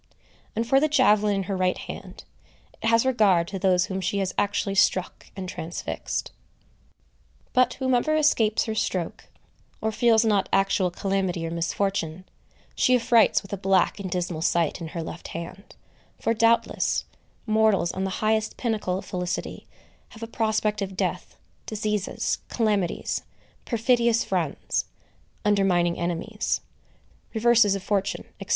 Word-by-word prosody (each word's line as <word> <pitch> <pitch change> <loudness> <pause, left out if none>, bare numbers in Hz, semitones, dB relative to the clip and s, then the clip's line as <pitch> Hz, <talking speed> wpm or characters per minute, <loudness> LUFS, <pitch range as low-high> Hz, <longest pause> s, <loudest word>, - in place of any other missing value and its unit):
And 230 +2 0
for 270 +3 +5
the 310 - +3
javelin 215 -8 +3
in 195 - -1
her 195 +1 -3
right 185 -1 +1
hand, - - -9 0.6
it 225 - -1
has 230 +2 +4
regard 205 -9 +3
to 195 - -5
those 185 -1 +3
whom 190 0 -4
she 200 - -1
has 190 -2 -1
actually 205 -1 0
struck 190 -1 +1
and 190 -2 -5
transfixed. 170 -1 -4 1.2
But 255 -1 +3
whoever 260 +3 +1
escapes 230 -8 +3
her 220 - -2
stroke, 185 -5 -2 0.5
or 220 - -1
feels 225 0 +3
not 205 -3 +2
actual 195 -1 +2
calamity 190 -2 -1
or 165 - -4
misfortune, 170 0 -2 0.5
she 255 - +3
affrights 235 -3 +4
with 195 - -10
a - - -1
black 190 +1 +2
and 195 -2 -4
dismal 175 -2 -2
sight 170 0 +1
in 165 - -4
her 165 +1 -5
left 165 - -8
hand; 175 +5 -8 0.4
for 230 - +1
doubtless, 230 +1 +2 0.4
mortals 215 -5 +3
on 190 - -3
the 190 -1 -3
highest 220 0 +1
pinnacle 215 -6 -1
of - - -7
felicity 180 -1 -4 0.4
have 225 -1 -11
a - - -4
prospect 215 -2 0
of 190 -1 -4
death, - - -3 0.3
diseases, 210 -2 -2
calamities, 210 -6 0 0.4
perfidious 235 0 +2
friends, - - -1 0.6
undermining 185 -4 +2
enemies, 175 +6 -2 0.7
reverses 225 -3 +4
of 195 - -5
fortune, 195 -1 -1 0.2
&c. - - -8
200 Hz, 145 wpm, -25 LUFS, 185-225 Hz, 1.2 s, for